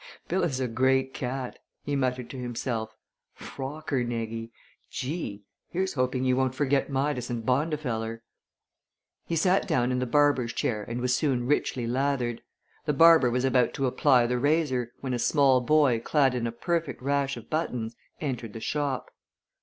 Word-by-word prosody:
"Bill 190 - 0
is 140 -7 0
a 130 - 0
great 130 +2 +1
cat," 130 0 -4 0.2
he 145 - -2
muttered 125 -2 -1
to 135 - -7
himself. 115 -2 -3 0.4
"Rockernegie! 120 -5 -3 0.4
Gee! 130 - -4 0.3
Here's 190 +2 -1
hoping 130 -1 0
he 130 -1 +3
won't 130 0 +1
forget 140 +1 +1
Midas 135 -2 -1
and 115 -2 -3
Bondifeller." 125 -5 -1 1.1
He 170 - -1
sat 185 +4 +2
down 130 -8 +1
in 125 - 0
the 125 - -1
barber's 145 -3 +3
chair 105 -3 -1
and 115 +3 -4
was 125 0 +2
soon 125 -4 0
richly 130 -2 0
lathered. 125 -1 0 0.4
The 150 - +1
barber 165 -3 +7
was 125 +2 0
about 125 -2 +2
to 135 - 0
apply 125 -1 +4
the 125 +1 0
razor, 140 -4 +1
when 130 -2 -2
a 120 - -1
small 135 -1 +4
boy 140 -3 +3
clad 135 +2 +2
in 120 -2 -1
a - - -3
perfect 165 +2 -2
rash 140 -1 0
of 115 - -12
buttons 125 -8 -2 0.2
entered 125 -7 -4
the 115 - -6
shop. 140 +1 -2
130 Hz, 160 wpm, -27 LUFS, 120-145 Hz, 1.1 s, barber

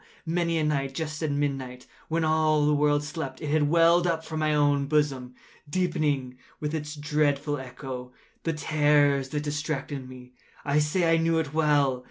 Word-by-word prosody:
Many 170 0 0
a 155 - +1
night, 135 -3 -1
just 155 0 -4
at 155 - 0
midnight, 135 -3 -3 0.2
when 165 +1 0
all 155 -1 +2
the 150 - +3
world 145 0 +2
slept, 145 -3 -5
it 150 - -5
has 155 0 +3
welled 170 +3 +4
up 160 -1 -1
from 155 -1 -4
my 155 0 +1
own 145 -2 +2
bosom, 135 -4 0 0.3
deepening, 145 -7 -1 0.2
with 150 0 -3
its 150 -1 -4
dreadful 145 -1 0
echo, 125 -1 -7 0.3
the 165 - -1
terrors 145 -2 +2
that 150 +1 -3
distracted 145 -2 -4
me. 125 -1 -12 0.3
I 145 +1 +2
say 165 +3 +2
I - - +4
knew 165 0 +2
it 155 -3 -2
well. 145 -4 +2
150 Hz, 175 wpm, -26 LUFS, 140-155 Hz, 0.3 s, welled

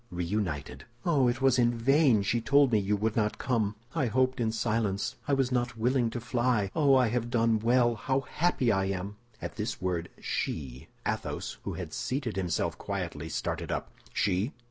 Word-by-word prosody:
Reunited!" 85 -8 -3 0.2
"Oh, 145 -7 +3
it 125 +2 -1
was 130 -1 +4
in 120 -1 +3
vain 130 -3 +4
she 115 +4 +1
told 140 +2 +4
me 110 - +4
you 100 +1 +1
would 110 +1 -1
not 105 -2 +1
come! 110 -5 0 0.2
I 145 -6 +1
hoped 130 +3 +1
in 115 -2 +1
silence. 110 0 -1
I 145 - +2
was 135 -2 +1
not 125 -1 0
willing 120 +1 +2
to 120 - -4
fly. 120 -4 0
Oh, 140 -3 +5
I 125 -3 +4
have 120 0 -1
done 115 -2 +2
well! 120 +1 +3
How 130 +5 0
happy 135 -4 +1
I 95 -2 +1
am!" 95 +2 -3 0.3
At - - -5
this 110 +2 -3
word 90 -2 -2
she, 65 -4 -3 0.2
Athos, - - -3
who - - -3
had - - -6
seated 125 -4 -2
himself 90 -4 -1
quietly, - - -4
started - - -3
up. - - -3 0.2
"_She! 105 - 0
115 Hz, 185 wpm, -29 LUFS, 105-130 Hz, 0.3 s, Oh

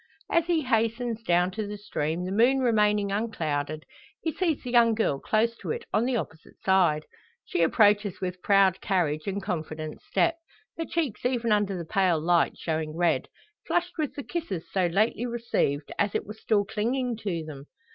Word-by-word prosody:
As 335 0 +2
he 335 -3 +2
hastens 230 -1 0
down 180 -3 +2
to 215 +1 -4
the 205 0 -5
stream, 175 -4 -2
the 185 - -4
moon 240 +7 +4
remaining 210 -5 +2
unclouded, 155 -8 -2 0.4
he 320 - -2
sees 330 -3 -1
the 250 - -5
young 235 -2 +5
girl 145 -11 0
close 225 +6 +1
to - - -7
it 460 0 -3
on 225 - +3
the 255 0 0
opposite 160 -8 -6
side. 175 -6 +3 0.4
She - - -1
approaches 205 +2 +3
with 180 -1 -4
proud 195 -2 +4
carriage, 160 -5 0
and 200 0 -2
confident 155 -4 -4
step, 335 -1 +1 0.4
her 330 - -3
cheeks 305 -12 -2
even 240 -2 0
under 205 -2 +2
the 170 - -5
pale 180 -1 +2
light 170 +2 +2
showing 155 -1 -3
red 175 -2 +1 0.4
flushed 350 -1 -1
with 300 -3 -1
the 285 - -5
kisses 285 - -4
so 185 -2 +2
lately 215 +7 +1
received, 230 -11 -1
as 200 0 +1
it - - -1
were 210 - -7
still 215 -1 +1
clinging 235 +4 -1
to 185 -7 -3
them. 145 -2 -9
205 Hz, 180 wpm, -27 LUFS, 175-235 Hz, 0.4 s, young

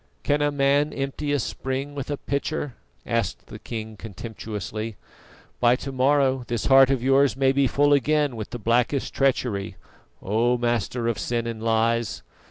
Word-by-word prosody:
"Can 145 0 +1
a 145 0 +2
man 145 +1 +2
empty 140 +2 -3
a 145 - +2
spring 135 +2 -3
with 140 -1 -5
a 145 - -2
pitcher?" 140 0 -3 0.3
asked 115 -5 -2
the - - -10
king 110 -2 -6
contemptuously. 110 +1 -6 0.6
"By 120 0 +5
to 135 +2 -6
morrow 135 0 +2
this 120 -2 -2
heart 135 -1 +7
of 135 -3 0
yours 135 0 +3
may 135 -1 +3
be 135 0 +2
full 145 +3 +3
again 145 -1 +2
with 110 -2 -6
the 120 - -5
blackest 120 +4 0
treachery, 120 -7 0 0.4
O 115 +5 +1
master 120 0 -1
of 115 - -1
sin 120 -1 -1
and 115 -1 -5
lies. 115 0 0
125 Hz, 165 wpm, -24 LUFS, 115-140 Hz, 0.6 s, heart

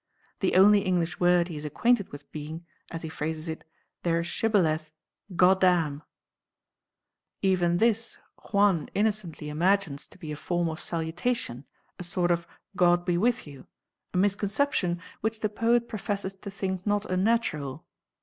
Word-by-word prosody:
The 190 - +1
only 205 +2 +7
English 180 -3 -1
word 175 -1 +4
he 170 - -7
is 150 - -6
acquainted 205 - +1
with 145 0 -11
being, 155 +3 -7 0.2
as 165 0 -6
he - - -3
phrases 155 +1 -4
it, 160 0 -5 0.4
"their 170 -1 +1
shibboleth, 165 -6 +1 0.4
'Goddamn.'" 180 -5 +4 1.4
Even 175 -3 +3
this 225 +2 +1 0.3
Juan 200 -7 +3
innocently 205 -7 -1
imagines 170 -1 +1
to - - -17
be 155 - -7
a - - -3
form 175 +2 -1
of 160 +1 -6
salutation, 165 - -2 0.3
a - - -4
sort 175 0 +1
of 170 0 0 0.3
God 175 -1 +4
be 175 - +1
with 240 +7 +1
you, 140 -3 -12 0.4
a - - -2
misconception 200 -1 +1 0.2
which 220 0 -2
the 215 - +1
poet 235 +3 +2
professes 200 -2 -3
to 195 +1 -9
think 190 -1 -4
not 205 0 +1
unnatural 185 - 0
180 Hz, 145 wpm, -27 LUFS, 160-205 Hz, 1.4 s, only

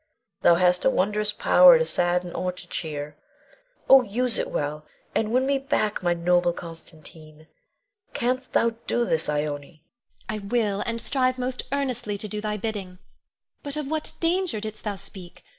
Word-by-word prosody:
Thou 170 - +6
hast 180 0 +3
a - - +5
wondrous 210 -1 +1
power - - +7
to 485 - +1
sadden 175 - 0
or 185 - -2
to 180 - -11
cheer. 150 -2 -5 0.7
Oh, 270 0 +8
use 245 +2 +1
it - - -2
well, 150 +1 -3 0.3
and 220 0 0
win 255 +2 +2
me 275 0 +1
back 215 -6 -1
my 175 -1 +1
noble 175 0 +2
Constantine! 160 -2 -11 0.7
Canst 255 +2 -2
thou 230 - +3 0.2
do 240 - +1
this, 160 -6 +2
Ione? 150 0 +1
Ione. 145 +2 -8 0.4
I 215 - -3
will; 205 -1 -1
and 230 0 -2
strive 255 0 0
most 255 0 -3
earnestly 250 -7 -2
to 210 - -5
do 210 +1 -4
thy 210 0 -2
bidding. 200 -4 -5 0.6
But 285 -1 -4
of 300 -2 -3
what 310 +1 -2
danger 345 - 0
didst 215 +1 -7
thou 205 -1 -2
speak? 190 -2 -12
210 Hz, 170 wpm, -25 LUFS, 175-250 Hz, 0.7 s, Oh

